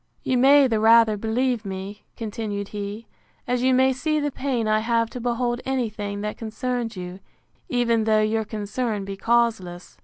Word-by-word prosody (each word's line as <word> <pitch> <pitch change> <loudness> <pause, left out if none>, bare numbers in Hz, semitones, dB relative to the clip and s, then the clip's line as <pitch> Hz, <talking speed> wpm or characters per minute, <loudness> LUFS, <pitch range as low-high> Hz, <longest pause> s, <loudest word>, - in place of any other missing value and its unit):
You 260 - 0
may 275 +3 +6
the 225 -4 +1
rather 225 0 +6
believe 230 +3 -1
me, 195 +1 -6 0.2
continued 210 -2 -4
he, 205 +2 -6 0.4
as 250 0 0
you 260 +1 +3
may 260 +1 +4
see 305 +4 -1
the 290 -1 -1
pain 255 -5 -2
I 215 0 +3
have 230 0 0
to 250 - -6
behold 240 0 -1
any 260 -3 -1
thing 205 -1 -5
that 210 0 -4
concerns 235 0 -3
you, 180 +1 -7 0.5
even 235 -3 +1
though 215 -1 +3
your 220 +1 0
concern 215 0 -3
be 195 0 -5
causeless. 215 -5 -1
225 Hz, 175 wpm, -24 LUFS, 210-245 Hz, 0.5 s, may